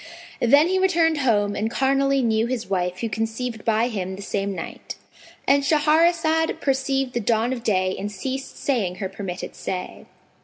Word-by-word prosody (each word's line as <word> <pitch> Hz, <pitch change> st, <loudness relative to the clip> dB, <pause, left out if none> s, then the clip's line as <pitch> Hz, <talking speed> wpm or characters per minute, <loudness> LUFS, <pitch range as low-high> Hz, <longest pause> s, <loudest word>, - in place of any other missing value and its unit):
Then 285 Hz, +7 st, +5 dB
he 375 Hz, +1 st, +1 dB
returned 335 Hz, -4 st, +3 dB
home 205 Hz, -6 st, +2 dB
and 220 Hz, +2 st, -1 dB
carnally 275 Hz, +2 st, +2 dB
knew 225 Hz, 0 st, +2 dB
his 240 Hz, -2 st, -3 dB
wife 180 Hz, -1 st, -1 dB
who 230 Hz, -, 0 dB
conceived 225 Hz, +2 st, -3 dB
by 225 Hz, +1 st, +2 dB
him 190 Hz, -5 st, -4 dB
the 200 Hz, -, -8 dB
same 200 Hz, 0 st, -2 dB
night.—And 280 Hz, +7 st, -3 dB
Shahrazad 320 Hz, +2 st, +2 dB
perceived 270 Hz, -1 st, 0 dB
the 240 Hz, -, 0 dB
dawn 230 Hz, +2 st, +1 dB
of 245 Hz, -, -5 dB
day 185 Hz, -4 st, +1 dB
and 205 Hz, +1 st, -4 dB
ceased 265 Hz, +7 st, -5 dB
saying 215 Hz, -10 st, -1 dB
her 190 Hz, -1 st, -4 dB
permitted 190 Hz, -2 st, -6 dB
say. 180 Hz, -1 st, -5 dB
235 Hz, 160 wpm, -23 LUFS, 205-275 Hz, -, Then